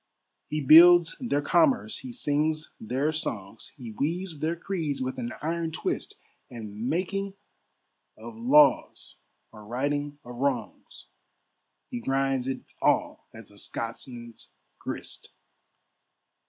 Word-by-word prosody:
He 155 Hz, 0 st, -2 dB
builds 170 Hz, +4 st, +8 dB
their 145 Hz, -, 0 dB
commerce, 255 Hz, -, +3 dB
he 260 Hz, -, -8 dB
sings 155 Hz, -, -1 dB
their 130 Hz, +7 st, 0 dB
songs, 110 Hz, -9 st, -4 dB
He 120 Hz, -5 st, -8 dB
weaves 165 Hz, -, -2 dB
their 160 Hz, +3 st, 0 dB
creeds 165 Hz, -5 st, -3 dB
with 130 Hz, 0 st, -3 dB
an 120 Hz, -1 st, -3 dB
iron 165 Hz, +1 st, -1 dB
twist, -, -, -3 dB, 0.3 s
And 110 Hz, 0 st, -5 dB
making 195 Hz, +3 st, -2 dB, 0.8 s
of 115 Hz, +1 st, -9 dB
laws 135 Hz, +4 st, +3 dB, 0.3 s
or 110 Hz, -1 st, -12 dB
righting 145 Hz, +6 st, -2 dB
of 120 Hz, 0 st, -9 dB
wrongs, 130 Hz, -4 st, -3 dB, 0.9 s
He 120 Hz, -, -3 dB
grinds 135 Hz, 0 st, 0 dB
it 135 Hz, -, -3 dB, 0.2 s
all -, -, +1 dB
as 110 Hz, -1 st, -13 dB
the 100 Hz, 0 st, -13 dB
Scotsman's 115 Hz, 0 st, -6 dB, 0.3 s
grist. -, -, -6 dB
140 Hz, 115 wpm, -27 LUFS, 120-165 Hz, 0.9 s, builds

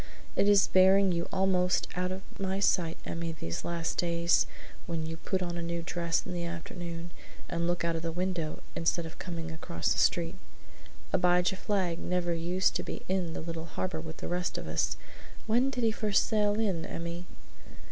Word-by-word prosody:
"It 200 Hz, -, +4 dB
is 200 Hz, -1 st, +7 dB
bearing 190 Hz, +1 st, +6 dB
you 170 Hz, -1 st, -1 dB
almost 185 Hz, -1 st, +2 dB
out 180 Hz, +1 st, 0 dB
of 190 Hz, +1 st, -4 dB, 0.2 s
my 190 Hz, 0 st, 0 dB
sight, 170 Hz, -4 st, +2 dB
Emmy, 165 Hz, 0 st, -3 dB
these 85 Hz, -, -4 dB
last 170 Hz, -1 st, -2 dB
days, 170 Hz, 0 st, +3 dB, 0.4 s
when 165 Hz, -2 st, -2 dB
you 165 Hz, +1 st, -4 dB
put 185 Hz, +3 st, -1 dB
on 175 Hz, -1 st, -3 dB
a -, -, -3 dB
new 170 Hz, 0 st, -2 dB
dress 170 Hz, -2 st, 0 dB
in -, -, -4 dB
the 175 Hz, -1 st, -2 dB
afternoon 170 Hz, 0 st, -5 dB, 0.4 s
and 170 Hz, 0 st, -1 dB
look 175 Hz, -1 st, 0 dB
out 170 Hz, -1 st, +1 dB
of 165 Hz, -, -2 dB
the 165 Hz, 0 st, -2 dB
window 175 Hz, -3 st, -2 dB
instead 165 Hz, 0 st, +1 dB
of 160 Hz, -, -9 dB
coming 165 Hz, -2 st, -4 dB
across 120 Hz, -, -1 dB
the -, -, -1 dB
street. -, -, +2 dB, 0.8 s
Abijah 180 Hz, +1 st, +4 dB
Flagg 190 Hz, -4 st, 0 dB
never 180 Hz, -1 st, 0 dB
used 175 Hz, +3 st, +1 dB
to -, -, -3 dB
be -, -, -5 dB
in 185 Hz, -3 st, 0 dB
the -, -, -4 dB
little 165 Hz, 0 st, -4 dB
harbor 180 Hz, 0 st, -3 dB
with 160 Hz, 0 st, -8 dB
the -, -, -5 dB
rest 180 Hz, +1 st, -1 dB
of -, -, -5 dB
us; -, -, 0 dB, 0.5 s
when 240 Hz, +4 st, +3 dB
did 250 Hz, -3 st, -2 dB
he 225 Hz, -, +4 dB
first 210 Hz, -2 st, +2 dB
sail 210 Hz, -1 st, +2 dB
in, 190 Hz, -7 st, +1 dB
Emmy?" 170 Hz, +1 st, -5 dB
175 Hz, 190 wpm, -30 LUFS, 165-190 Hz, 0.8 s, is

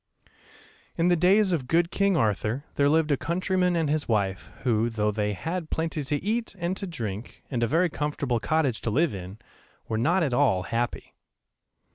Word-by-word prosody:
In 170 Hz, +1 st, +3 dB
the 175 Hz, -, +5 dB
days 190 Hz, +4 st, +4 dB
of 145 Hz, -8 st, -1 dB
good 170 Hz, +3 st, +2 dB
king 200 Hz, -3 st, +2 dB
Arthur 110 Hz, +3 st, 0 dB
there 140 Hz, 0 st, +3 dB
lived 155 Hz, 0 st, +2 dB
a 140 Hz, -, +3 dB
countryman 180 Hz, +2 st, 0 dB
and 165 Hz, -2 st, +1 dB
his 150 Hz, +1 st, -1 dB
wife 95 Hz, -6 st, -1 dB
who, 115 Hz, -2 st, +2 dB
though 105 Hz, -2 st, 0 dB
they 105 Hz, 0 st, -1 dB
had 165 Hz, -, -4 dB
plenty 160 Hz, -2 st, -2 dB
to 145 Hz, +2 st, -2 dB
eat 225 Hz, +2 st, -1 dB
and 175 Hz, +1 st, -2 dB
to 195 Hz, -, -4 dB
drink, 110 Hz, -, -6 dB
and 120 Hz, -3 st, -1 dB
a 115 Hz, -, +2 dB
very 165 Hz, +8 st, +3 dB
comfortable 145 Hz, -5 st, -1 dB
cottage 145 Hz, -3 st, 0 dB
to -, -, -1 dB
live 150 Hz, +5 st, +2 dB
in, 95 Hz, +1 st, -7 dB, 0.5 s
were 110 Hz, -1 st, -1 dB
not 170 Hz, +9 st, +2 dB
at 140 Hz, -5 st, 0 dB
all 120 Hz, -9 st, +3 dB
happy. 115 Hz, +4 st, -3 dB
145 Hz, 185 wpm, -26 LUFS, 115-170 Hz, 0.5 s, the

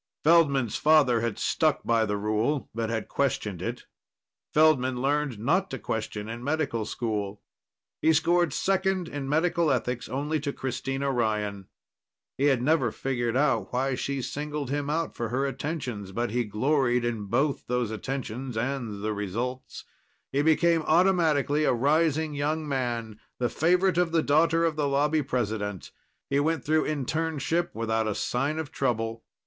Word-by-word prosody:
Feldman's 145 Hz, -8 st, +4 dB
father 145 Hz, -7 st, +4 dB
had 115 Hz, -3 st, -2 dB
stuck -, -, +1 dB
by 115 Hz, -1 st, +2 dB
the 105 Hz, 0 st, -1 dB
rule 110 Hz, +5 st, -1 dB
but 115 Hz, 0 st, -2 dB
had 115 Hz, -1 st, -2 dB
questioned 105 Hz, -9 st, -1 dB
it. 120 Hz, +5 st, -4 dB, 0.7 s
Feldman 135 Hz, -5 st, +3 dB
learned 140 Hz, -2 st, 0 dB
not 170 Hz, -, +1 dB
to 135 Hz, -, -4 dB
question 110 Hz, -1 st, -4 dB
in 115 Hz, +2 st, -6 dB
medical 140 Hz, -6 st, -1 dB
school. 105 Hz, -4 st, -3 dB, 0.6 s
He 160 Hz, -, +4 dB
scored 170 Hz, +2 st, +3 dB
second 190 Hz, -2 st, 0 dB
in 140 Hz, -3 st, -5 dB
Medical 165 Hz, +1 st, +2 dB
Ethics 125 Hz, -2 st, -1 dB
only 145 Hz, +4 st, -1 dB
to 145 Hz, 0 st, -2 dB
Christina 135 Hz, +1 st, -2 dB
Ryan. 105 Hz, -5 st, -1 dB, 0.7 s
He 140 Hz, -, 0 dB
had 135 Hz, -4 st, +3 dB
never 135 Hz, -5 st, +2 dB
figured 120 Hz, -2 st, -2 dB, 0.3 s
why 130 Hz, +2 st, 0 dB
she 135 Hz, +1 st, -2 dB
singled 145 Hz, +1 st, -4 dB
him 145 Hz, 0 st, -1 dB
out 165 Hz, +2 st, -1 dB
for 115 Hz, -1 st, -3 dB
her 130 Hz, +4 st, 0 dB
attentions, 130 Hz, -, -4 dB
but 120 Hz, +3 st, -2 dB
he 120 Hz, +1 st, 0 dB
gloried 125 Hz, +2 st, +1 dB
in 115 Hz, -3 st, -2 dB
both 135 Hz, +7 st, 0 dB
those 125 Hz, -2 st, -1 dB
attentions 125 Hz, +1 st, -4 dB
and 115 Hz, -4 st, -3 dB
the 110 Hz, 0 st, -1 dB
results. 115 Hz, +6 st, -4 dB, 0.5 s
He 140 Hz, -, +1 dB
became 165 Hz, +2 st, +3 dB
automatically 155 Hz, -3 st, +3 dB
a 150 Hz, -, +3 dB
rising 155 Hz, +4 st, +2 dB
young 150 Hz, +2 st, -1 dB
man, 120 Hz, -5 st, -2 dB, 0.2 s
the 120 Hz, -1 st, 0 dB
favorite 180 Hz, +2 st, +2 dB
of 175 Hz, -2 st, +2 dB
the 165 Hz, -1 st, +2 dB
daughter 165 Hz, +3 st, +3 dB
of 165 Hz, -2 st, 0 dB
the 150 Hz, -2 st, 0 dB
Lobby 150 Hz, +3 st, +2 dB
president. 110 Hz, -, -3 dB, 0.4 s
He 140 Hz, -, +1 dB
went 160 Hz, -1 st, 0 dB
through 155 Hz, +1 st, +2 dB
internship 160 Hz, +3 st, -1 dB
without 110 Hz, 0 st, 0 dB
a 105 Hz, -, -1 dB
sign 140 Hz, +5 st, -1 dB
of 160 Hz, -2 st, -4 dB
trouble. 115 Hz, -5 st, -1 dB
135 Hz, 155 wpm, -27 LUFS, 115-155 Hz, 0.7 s, Feldman's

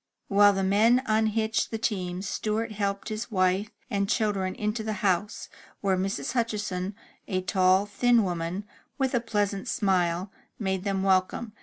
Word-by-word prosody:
While 205 Hz, 0 st, +6 dB
the 195 Hz, 0 st, -1 dB
men 220 Hz, +6 st, +4 dB
unhitched 220 Hz, -1 st, +1 dB
the 225 Hz, -, -3 dB
teams, 185 Hz, -4 st, -2 dB
Stewart 220 Hz, +3 st, -2 dB
helped 200 Hz, -1 st, -2 dB
his 215 Hz, +2 st, -4 dB
wife 190 Hz, 0 st, +1 dB, 0.2 s
and 200 Hz, -5 st, -1 dB
children 210 Hz, 0 st, 0 dB
to 220 Hz, -1 st, -4 dB
the 215 Hz, 0 st, -2 dB
house, 190 Hz, +2 st, 0 dB, 0.3 s
where 195 Hz, -2 st, +2 dB
Mrs. 190 Hz, +1 st, -2 dB
Hutchinson, 210 Hz, -5 st, -2 dB, 0.3 s
a 185 Hz, -1 st, -1 dB
tall, 185 Hz, +1 st, +3 dB
thin 235 Hz, +3 st, +3 dB
woman, 175 Hz, +1 st, -3 dB, 0.3 s
with 265 Hz, -1 st, 0 dB
a 245 Hz, -, +3 dB
pleasant 205 Hz, -3 st, -1 dB
smile, 185 Hz, -3 st, +1 dB, 0.3 s
made 190 Hz, -3 st, -2 dB
them 195 Hz, -1 st, 0 dB
welcome. 190 Hz, +3 st, +1 dB
200 Hz, 150 wpm, -27 LUFS, 190-220 Hz, 0.3 s, While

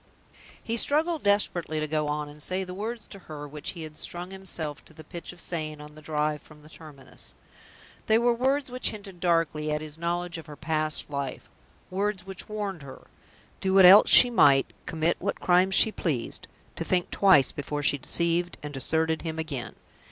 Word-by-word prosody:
He 230 Hz, +1 st, -2 dB
struggled 315 Hz, +5 st, +2 dB
desperately 180 Hz, -6 st, +1 dB
to 155 Hz, -, -2 dB
go 155 Hz, 0 st, -1 dB
on 150 Hz, 0 st, -2 dB
and 150 Hz, +1 st, -11 dB
say 185 Hz, +5 st, 0 dB
the 180 Hz, -1 st, -7 dB
words 220 Hz, +3 st, -5 dB
to 195 Hz, -, -11 dB
her 145 Hz, -1 st, -7 dB
which 150 Hz, 0 st, -5 dB
he 170 Hz, -3 st, -7 dB
had 155 Hz, -1 st, -9 dB
strung 175 Hz, +2 st, -4 dB
himself 170 Hz, -6 st, -4 dB
to 160 Hz, -, -13 dB
the 155 Hz, -, -12 dB
pitch 170 Hz, +2 st, -8 dB
of 180 Hz, -, -14 dB
saying 155 Hz, -3 st, -4 dB
on 150 Hz, 0 st, -11 dB
the 155 Hz, -, -14 dB
drive 150 Hz, -1 st, -1 dB
from 150 Hz, -1 st, -17 dB
the 155 Hz, -, -15 dB
terminus. 150 Hz, -5 st, -10 dB, 0.7 s
They 220 Hz, -, +5 dB
were 240 Hz, +1 st, +3 dB
words 265 Hz, +2 st, 0 dB
which 250 Hz, 0 st, +2 dB
hinted 200 Hz, -4 st, -10 dB
darkly 165 Hz, -3 st, 0 dB
at 150 Hz, -, 0 dB
his 155 Hz, 0 st, -7 dB
knowledge 175 Hz, 0 st, -2 dB
of 160 Hz, -, -12 dB
her 150 Hz, -, -9 dB
past 155 Hz, 0 st, -2 dB
life; 140 Hz, -2 st, -5 dB, 0.4 s
words 195 Hz, 0 st, -2 dB
which 195 Hz, +1 st, -6 dB
warned 205 Hz, -5 st, -4 dB
her 135 Hz, -1 st, -12 dB, 0.5 s
do 190 Hz, 0 st, 0 dB
what 190 Hz, -1 st, +8 dB
else 195 Hz, +3 st, +9 dB
she 245 Hz, -, +8 dB
might, 140 Hz, -, +4 dB
commit 165 Hz, +1 st, 0 dB
what 200 Hz, -, -3 dB
crimes 185 Hz, +2 st, +3 dB
she 220 Hz, -, +7 dB
pleased 145 Hz, -, -3 dB, 0.3 s
to -, -, -2 dB
think 180 Hz, -1 st, -1 dB
twice 190 Hz, -9 st, +5 dB
before 145 Hz, +1 st, -4 dB
she 145 Hz, 0 st, +2 dB
deceived 170 Hz, +5 st, -1 dB
and 150 Hz, 0 st, -6 dB
deserted 160 Hz, +4 st, -1 dB
him 160 Hz, -1 st, -5 dB
again. 155 Hz, -6 st, -5 dB
165 Hz, 195 wpm, -27 LUFS, 150-190 Hz, 0.7 s, else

